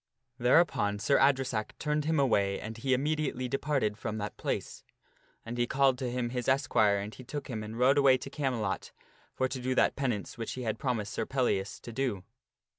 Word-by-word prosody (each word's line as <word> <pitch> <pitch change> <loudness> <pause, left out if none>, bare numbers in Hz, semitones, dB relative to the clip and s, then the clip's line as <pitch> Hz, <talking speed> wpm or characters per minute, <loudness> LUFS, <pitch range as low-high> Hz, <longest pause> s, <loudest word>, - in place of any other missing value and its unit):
Thereupon 125 -5 +3
Sir 140 +7 +2
Adresack 130 -6 +1
turned 150 -1 -1
him 160 -1 +2
away 100 -7 +2
and 110 +1 -6
he 130 +3 +1
immediately 145 -2 -1
departed 135 -5 -1
from 110 -2 -3
that 105 -1 -4
place. - - -4 0.6
And 120 +1 -5
he 120 - +2
called 135 -2 +3
to 130 - -2
him 120 -1 -2
his 125 -1 -3
esquire 110 -6 +3
and 100 +2 -5
he 130 - -11
took 140 +1 -6
him 110 -3 -3
and 110 +1 -7
rode 135 +4 +4
away 135 -2 +6
to 130 - -8
Camelot 125 -9 -2 0.4
for 130 - +1
to 130 0 -5
do 130 +1 -1
that - - +3
penance 120 -5 -2
which 115 - -3
he 130 - -5
had 110 -1 -2
promised 115 -6 -2
Sir 110 - -2
Pellias 120 -7 0
to 120 - -9
do. 115 -7 -1
125 Hz, 195 wpm, -30 LUFS, 110-135 Hz, 0.6 s, away